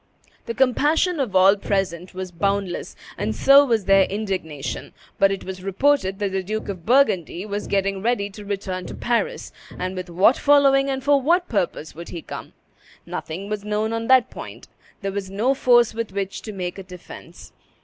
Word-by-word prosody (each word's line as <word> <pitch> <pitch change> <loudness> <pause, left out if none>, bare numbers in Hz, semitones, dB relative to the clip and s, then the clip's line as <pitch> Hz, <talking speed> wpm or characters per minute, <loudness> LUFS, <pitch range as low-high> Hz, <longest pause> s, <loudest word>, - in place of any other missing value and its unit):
The 230 - -3
compassion 300 +6 +2
of 235 -9 -2
all 190 +2 +6
present 190 -3 -2
was 185 -1 -5
boundless, 195 +1 -2 0.2
and - - -1
so 275 +1 +7
was 225 -6 0
their 195 0 +5
indignation; 190 -8 -4 0.3
but 195 - +5
it 195 - -4
was 185 -1 -7
reported 195 0 +1
that 200 -1 -2
the 190 0 -1
Duke 215 +3 -4
of 185 -3 -7
Burgundy 200 - +2
was 205 0 -4
getting 195 -1 0
ready 225 -2 0
to 210 +1 -10
return 195 -2 -4
to - - -7
Paris, 235 -3 -2 0.3
and 185 +1 -3
with 185 -1 -6
what 190 +9 +4
following 275 -1 +4
and 265 -1 -2
for 285 0 +3
what 345 +6 +2
purpose 180 -7 -2
would 170 +1 -9
he 170 - -7
come? - - -8 0.5
Nothing 180 +5 -6
was 210 -1 -4
known 210 +1 -1
on 230 0 -3
that 260 -2 +5
point. - - -10 0.4
There 195 - -1
was 195 -1 -4
no 220 +8 +1
force 240 -4 +4
with 230 -3 -4
which 195 -1 -3
to 215 - -7
make 185 -1 -5
a - - -7
defence. 180 -1 -12
200 Hz, 185 wpm, -22 LUFS, 190-240 Hz, 0.5 s, so